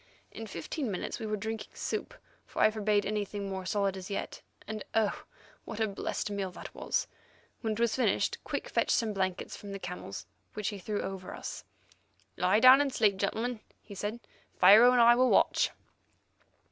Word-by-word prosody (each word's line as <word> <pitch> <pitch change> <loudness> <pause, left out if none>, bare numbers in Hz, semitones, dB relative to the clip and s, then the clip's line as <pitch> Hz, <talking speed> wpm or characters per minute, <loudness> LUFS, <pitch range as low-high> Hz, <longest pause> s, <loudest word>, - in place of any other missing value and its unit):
In 225 - -7
fifteen 215 - -4
minutes 190 +4 -4
we 220 - -4
were 215 0 -1
drinking 220 +2 -5
soup, - - -4 0.3
for - - -7
I 215 - +6
forbade 210 -1 +1
anything 205 -1 -3
more 190 -1 -5
solid 200 -1 0
as 190 +1 -8
yet, 200 - -4 0.3
and, 215 -1 -5
oh! 220 -2 +1 0.4
what 220 - -7
a 220 - +2
blessed 205 +1 -3
meal 195 -2 -3 0.2
was - - -1
that. - - -35 0.5
When 220 -2 -1
it 215 - -6
was 235 -1 +2
finished, 260 - +1
Quick - - -4
fetched - - 0
some 220 -2 +1
blankets 190 -2 -2
from 200 -1 -9
the - - -4
camels, 180 - -7 0.3
which 210 -1 -1
he 205 -2 -6
threw 205 +2 -3
over 190 -1 -6
us. - - -7 0.7
"Lie 185 +4 +3
down 255 +3 +9
and 285 -1 0
sleep, 210 -6 +2
gentlemen," 225 +4 -1 0.2
he 205 - -12
said; 205 +4 -4 0.4
"Pharaoh 215 +7 +8
and 250 -1 +4
I 235 +1 +8
will 255 +1 +3
watch." - - +3
210 Hz, 185 wpm, -30 LUFS, 195-225 Hz, 0.7 s, down